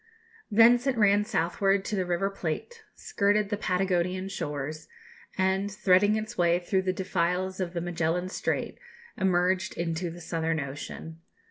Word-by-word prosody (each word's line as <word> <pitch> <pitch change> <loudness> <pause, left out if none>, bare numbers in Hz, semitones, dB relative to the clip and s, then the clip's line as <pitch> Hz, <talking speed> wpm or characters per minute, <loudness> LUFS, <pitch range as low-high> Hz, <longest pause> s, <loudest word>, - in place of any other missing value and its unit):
Thence 235 +4 +5
it 260 -3 +1
ran 205 -1 +4
southward 195 +3 +1
to 215 - -2
the 185 -2 -1
River 180 +3 0
Plate, 195 - -5
skirted 205 0 +1
the 210 - 0
Patagonian 185 -1 0
shores, 150 -4 -5 0.5
and, 190 +1 +1
threading 205 0 +3
its 220 +2 -4
way 175 -3 +3
through 190 +2 0
the 190 0 0
defiles 185 0 -1
of 180 -2 -2
the 170 - -2
Magellan 175 +1 -1
Strait, - - -2 0.4
emerged 185 -1 +1
into 170 +1 -2
the 170 +1 -9
Southern 165 -1 -2
Ocean. 150 +3 -7
185 Hz, 145 wpm, -28 LUFS, 170-200 Hz, 0.5 s, Thence